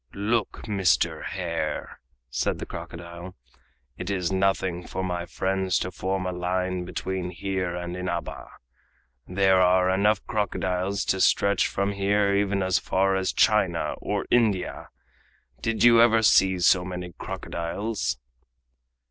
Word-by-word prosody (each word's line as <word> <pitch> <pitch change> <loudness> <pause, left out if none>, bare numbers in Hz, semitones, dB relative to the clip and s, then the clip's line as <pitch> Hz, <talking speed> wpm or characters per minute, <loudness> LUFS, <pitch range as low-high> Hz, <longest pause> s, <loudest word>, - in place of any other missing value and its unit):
"Look, 105 +2 -1
Mr. 95 -6 +1
Hare!" - - -4 0.3
said - - -1
the - - -6
crocodile, 85 +2 -9 0.6
"it 90 - -4
is 90 -3 -1
nothing 95 -2 0
for 95 - -4
my 90 -1 -3
friends 95 0 0
to 90 - -3
form 95 +1 -2
a 90 - -1
line 90 0 -2
between 95 0 -4
here 90 -1 -3
and 90 0 -5
Inaba. 90 -2 -4 0.8
There 95 0 +3
are 90 0 +4
enough 100 +2 +2
crocodiles 95 -1 -1
to 95 - 0
stretch 100 +2 +3
from 100 +1 -1
here 100 0 +1
even 100 -1 +1
as 95 -1 +2
far 95 +1 +1
as 95 -1 0
China 95 -6 +2
or - - -2
India. 110 -7 +1 0.7
Did 115 0 0
you 120 -1 +7
ever 115 -1 +5
see 95 -3 +5
so 90 +1 +4
many 90 -1 -6
crocodiles?" 85 - -3
95 Hz, 130 wpm, -25 LUFS, 90-100 Hz, 0.8 s, you